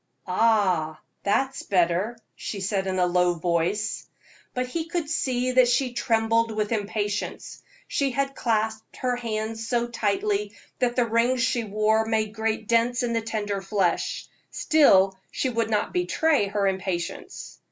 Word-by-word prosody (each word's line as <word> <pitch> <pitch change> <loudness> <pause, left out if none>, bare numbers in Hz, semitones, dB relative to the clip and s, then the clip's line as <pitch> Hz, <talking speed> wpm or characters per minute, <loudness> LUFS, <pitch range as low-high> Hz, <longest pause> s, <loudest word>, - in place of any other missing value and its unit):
"Ah! 185 -7 +2 0.2
that's 265 +7 0
better," 185 +5 +1 0.2
she 205 - -5
said 195 0 -1
in 185 0 -1
a 180 - +3
low 180 0 +2
voice. 175 +6 -1 0.5
But 250 0 0
he 320 +6 -3
could 335 -2 -3
see 255 -5 0
that 255 -1 +5
she 250 +1 +1
trembled 230 0 +1
with 215 -1 -2
impatience. 205 -1 -3 0.3
She 280 -1 0
had 275 +1 -1
clasped 220 -3 -2
her 250 -1 0
hands 225 -1 -4
so 240 0 +1
tightly 400 - -1 0.3
that 245 -1 +1
the 245 - +3
rings 235 +2 +2
she 255 -2 +1
wore 215 +1 +2
made 220 -1 0
great 220 0 -2
dents 235 +2 +2
in 235 -1 -1
the 230 - +1
tender 210 -3 -3
flesh; 195 -3 -1 0.2
still 195 - +4
she 260 - -1
would 230 -2 -1
not 210 -2 0
betray 320 - +2
her 200 0 -1
impatience. 190 -2 -4
225 Hz, 150 wpm, -25 LUFS, 200-245 Hz, 0.5 s, that